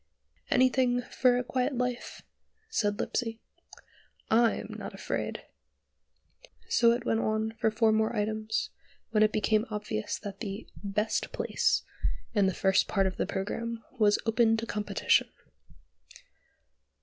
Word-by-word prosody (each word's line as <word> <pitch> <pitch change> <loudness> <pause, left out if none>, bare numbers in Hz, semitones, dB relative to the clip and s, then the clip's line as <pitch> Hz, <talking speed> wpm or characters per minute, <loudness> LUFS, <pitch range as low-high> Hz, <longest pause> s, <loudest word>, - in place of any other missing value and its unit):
"Anything 255 -1 +3
for 245 0 +2
a 250 - 0
quiet 255 +1 -1
life," 250 0 -3 0.5
said 205 - +1
Lipsey. 230 -2 -2 0.9
"I'm 230 +1 +2
not - - -7
afraid." - - -3 1.2
So 235 -1 +4
it 240 - -3
went 225 - +1
on 220 0 0
for 220 - +3
four 220 0 +3
more 220 +1 +1
items, 215 +1 -1 0.4
when 215 -1 +3
it 215 0 +5
became 215 +1 +1
obvious 210 - -3
that 200 -2 -8
the 205 0 -5 0.2
"best 210 +2 -1
place," - - +1 0.5
in 205 -3 +3
the 190 - -1
first 190 0 +3
part 195 -2 +1
of 190 - -2
the - - -1
programme 225 +4 -3 0.2
was 205 -1 +5
open 225 0 +3
to 225 - -3
competition. 210 -3 +1
220 Hz, 130 wpm, -29 LUFS, 210-235 Hz, 1.2 s, it